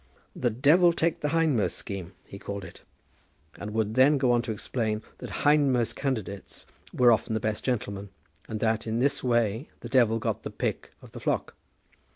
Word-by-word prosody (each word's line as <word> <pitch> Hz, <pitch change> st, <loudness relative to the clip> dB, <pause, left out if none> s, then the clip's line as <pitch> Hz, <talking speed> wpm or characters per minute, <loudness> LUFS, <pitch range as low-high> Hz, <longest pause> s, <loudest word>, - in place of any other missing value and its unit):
The 125 Hz, -, +1 dB
"Devil 155 Hz, +9 st, +4 dB
take 165 Hz, 0 st, 0 dB
the 150 Hz, -, -1 dB
hindmost" 160 Hz, -8 st, +1 dB
scheme, 95 Hz, -2 st, -6 dB
he 100 Hz, -, -10 dB
called 100 Hz, -1 st, -6 dB
it; 85 Hz, -, -13 dB, 0.8 s
and 105 Hz, -, -5 dB
would 110 Hz, -1 st, 0 dB
then 135 Hz, +4 st, +5 dB
go 130 Hz, -2 st, +2 dB
on 120 Hz, -1 st, +3 dB
to 120 Hz, -, -4 dB
explain 110 Hz, 0 st, -2 dB, 0.2 s
that 115 Hz, -5 st, -6 dB
hindmost 140 Hz, -5 st, +3 dB
candidates 110 Hz, -8 st, -4 dB, 0.3 s
were 125 Hz, -1 st, +5 dB
often 110 Hz, 0 st, +1 dB
the -, -, +1 dB
best 110 Hz, 0 st, -2 dB
gentlemen, 100 Hz, -5 st, -2 dB, 0.4 s
and 110 Hz, -1 st, -4 dB
that, 110 Hz, 0 st, 0 dB
in 110 Hz, +1 st, -1 dB
this 135 Hz, +4 st, +1 dB
way, 120 Hz, +1 st, +1 dB
the -, -, -7 dB
Devil 115 Hz, -4 st, +4 dB
got 115 Hz, -, -2 dB
the -, -, -5 dB
pick -, -, -3 dB
of -, -, -13 dB
the -, -, -8 dB
flock. -, -, -1 dB
115 Hz, 185 wpm, -27 LUFS, 105-130 Hz, 0.8 s, then